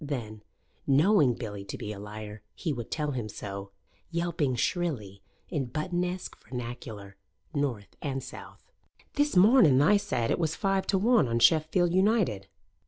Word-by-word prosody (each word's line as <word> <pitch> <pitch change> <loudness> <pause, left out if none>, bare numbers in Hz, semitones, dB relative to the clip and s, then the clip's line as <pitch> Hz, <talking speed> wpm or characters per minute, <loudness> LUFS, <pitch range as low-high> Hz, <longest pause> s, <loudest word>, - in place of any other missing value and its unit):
Then, 115 -7 -5 0.5
knowing 145 - +4
Billy 105 -4 -6
to - - -6
be 105 - -5
a 100 - -9
liar, 105 0 -8
he 160 -5 -2
would 120 -4 -6
tell 150 -2 -2
him 120 -5 -4
so, 100 -1 -7 0.4
yelping 170 -6 -1
shrilly, 120 - -2 0.3
in 145 -7 -2
Buttonesque 180 +6 -3
vernacular 115 -5 -7 0.4
(North 125 -9 -2
and 135 -3 -3
South): - - -11 0.4
"This 290 -3 +1
morning 200 - +7
tha 185 +9 +5
said 115 -11 -1
it - - +1
was 160 -2 0
five 195 -1 0
to 195 - +2
one 220 - +4
on 115 0 0
Sheffield 160 +7 +3
United." 190 - +2
140 Hz, 150 wpm, -28 LUFS, 110-175 Hz, 0.5 s, morning